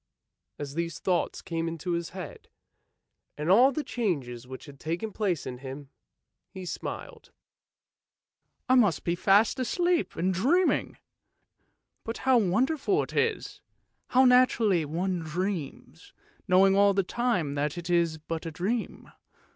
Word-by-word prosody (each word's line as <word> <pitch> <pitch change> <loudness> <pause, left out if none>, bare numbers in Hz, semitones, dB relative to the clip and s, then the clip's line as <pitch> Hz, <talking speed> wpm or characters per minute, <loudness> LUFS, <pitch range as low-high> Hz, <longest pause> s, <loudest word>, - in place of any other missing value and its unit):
As 140 -1 -6
these 170 +1 -3
thoughts 180 -2 -1
came 165 0 -3
into 165 +2 -4
his 170 -1 -2
head, 180 -4 -9 0.9
and 150 +4 0
all 250 +7 +6
the 295 +3 -3
changes 135 - -3
which 130 0 -9
had 140 -2 -13
taken 170 +7 -3
place 190 -7 -1
in 125 -1 -6
him, 135 +1 -9 0.6
he 190 -1 -9
smiled. - - -7 0.7
" - - -55
I 255 - +3
must 210 - +3
be 170 - 0
fast 200 +7 +3
asleep 345 +7 0
and 185 +3 0
dreaming! 310 - +1 1.1
But 225 - -5
how 260 -2 +5
wonderful 265 - +1
it - - -9
is! 455 -2 -1 0.5
how 260 +1 +4
naturally 235 -8 +4
one 175 +4 -2
dreams, 170 0 -5 0.3
knowing 190 +1 +5
all 200 0 +4
the 195 - +2
time 185 - -1
that 145 +2 -2
it 170 -1 -6
is 170 -2 +1
but 160 +1 -5
a - - -4
dream. 210 +9 -3
180 Hz, 140 wpm, -28 LUFS, 160-230 Hz, 1.1 s, all